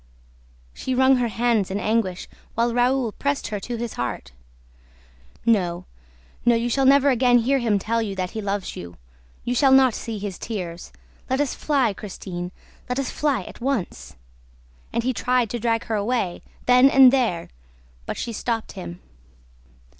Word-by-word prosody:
She 260 - -3
wrung 260 +1 +5
her 245 -1 +1
hands 230 -3 +1
in 195 +2 -2
anguish, 210 -4 -1 0.3
while 235 +1 +1
Raoul 245 -1 +2
pressed 280 +5 -2
her 210 - -3
to 240 +4 -5
his 235 -1 -4
heart. 120 - -4 1.1
"No, 180 -7 +1 0.6
no, 240 0 +4
you 235 +1 0
shall 270 +2 +2
never 280 +1 +6
again 245 -1 +4
hear 265 +4 +2
him 225 -4 +2
tell 230 +4 -1
you 205 -3 -3
that 185 -1 -3
he 220 - -4
loves 200 -1 -3
you! 85 0 -9 0.5
You 245 - -1
shall 270 +2 +4
not 265 -2 +6
see 225 0 -5
his 200 -2 -5
tears! 180 -6 -6 0.4
Let 260 +1 +1
us 290 -3 0
fly, 270 -8 +1
Christine, 180 -3 -7 0.4
let 250 - -1
us 275 -2 -2
fly 280 -9 0
at - - -12
once!" 255 -7 -3 0.8
And 235 - -1
he 255 +1 0
tried 245 +1 +1
to 240 - -2
drag 230 0 0
her 225 - -4
away, 205 -4 -1 0.2
then 250 +2 +6
and 265 -2 +7
there. 225 -11 0 0.6
But - - -4
she 235 - -4
stopped 225 0 -2
him. 85 0 -8
230 Hz, 170 wpm, -23 LUFS, 200-255 Hz, 1.1 s, and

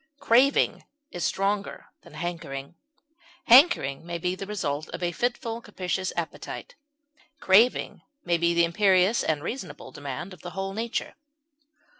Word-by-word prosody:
Craving 260 +3 +3 0.3
is 175 - -5
stronger 200 +1 -1 0.2
than - - -16
hankering; 155 -5 -5 0.7
hankering 245 - +5
may 170 0 -4
be 180 +1 -1
the 195 +1 -7
result 155 -7 -3
of - - -6
a 175 - 0
fitful 240 +3 -2
and 235 - -13
capricious 185 -2 -3
appetite; 170 - -5 0.7
craving 215 +6 +3 0.2
may 170 -1 +1
be 170 0 +2
the 170 0 +5
imperious 190 +3 +3
and 150 -2 -1
reasonable 260 +3 -6
demand 145 +6 -6
of 185 - -14
the 175 - -7
whole 195 0 -3
nature. 230 +3 -3
185 Hz, 140 wpm, -26 LUFS, 170-220 Hz, 0.7 s, hankering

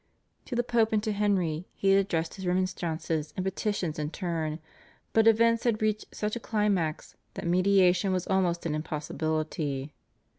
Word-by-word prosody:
To 250 - -5
the 240 - +2
Pope 230 -2 +2
and 210 -1 +2
to 220 - 0
Henry 190 -5 0
he 195 - +1
had 195 - +6
addressed 165 -4 -2
his 190 -2 -6
remonstrances 170 -4 -1
and 185 - -2
petitions 190 -5 -2
in 150 -1 -2
turn, 160 -3 -3 0.6
but 225 0 +5
events 230 +1 +4
had 230 -3 +1
reached 215 -1 0
such 210 +1 -2
a - - -3
climax 205 -9 -1 0.2
that - - -5
mediation 185 +1 +3
was 185 -1 0
almost 180 -3 +1
an 160 - -1
impossibility. 155 -2 -3
185 Hz, 160 wpm, -28 LUFS, 160-210 Hz, 0.6 s, had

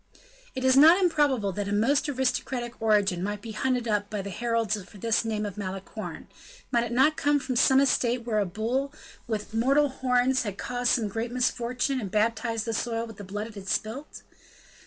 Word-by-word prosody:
It 260 - -3
was 260 0 +4
not 320 +6 +8
improbable 290 - +2
that 200 +2 -4
a - - -3
most 235 +9 +2
aristocratic 250 -3 -2
origin 205 -5 +2
might 205 +2 -3
be 220 +2 -8
hunted 250 +2 -1
up 205 -1 0
by 210 -2 -3
the 200 - -6
heralds 230 0 0
for 200 +3 -15
this 225 +3 +1
name 215 -2 -2
of 205 -1 -6
Malicorne; 195 -1 -6 0.4
might 235 -1 +2
it 240 - -6
not 270 +6 +4
come 290 0 +2
from 260 -2 -4
some 265 +3 +5
estate 245 -3 +1
where 220 -3 0
a 205 - +1
bull 235 +9 -2 0.4
with 215 -1 -4
mortal 275 +6 +3
horns 260 0 +1
had 205 -4 -4
caused 245 -1 -1
some 225 -4 +1
great 225 +4 -4
misfortune, 250 +1 -1
and 200 - -4
baptized 225 +2 0
the 230 - -2
soil 230 +1 -2
with 225 -2 -11
the 205 - -8
blood 205 +2 -5
it 225 - -10
had 200 -2 -10
spilt? 255 +8 -3
230 Hz, 200 wpm, -27 LUFS, 210-260 Hz, 0.4 s, not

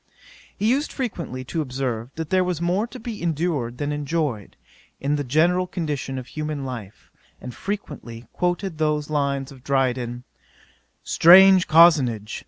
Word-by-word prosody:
'He 210 - 0
used 270 +6 +1
frequently 175 - -4
to 160 +5 -3
observe, 125 -4 -3
that 160 -1 -5
there 185 -1 +3
was 180 -3 -2
more 180 +6 0
to 255 - -10
be 225 -2 -7
endured 155 -7 -2
than 145 +2 -2
enjoyed, 145 - -3 0.4
in 145 +2 0
the 145 - -2
general 170 +7 +2
condition 150 -7 -4
of 130 - -6
human 150 0 -5
life; 115 -6 -9 0.3
and 125 - -8
frequently 130 - -6
quoted 175 -1 -2
those 150 -1 0
lines 140 -2 -1
of 130 -2 -15
Dryden: 125 -3 -1 0.8
"Strange 185 +2 +7
cozenage! 145 -10 +4
150 Hz, 145 wpm, -23 LUFS, 130-175 Hz, 0.8 s, Strange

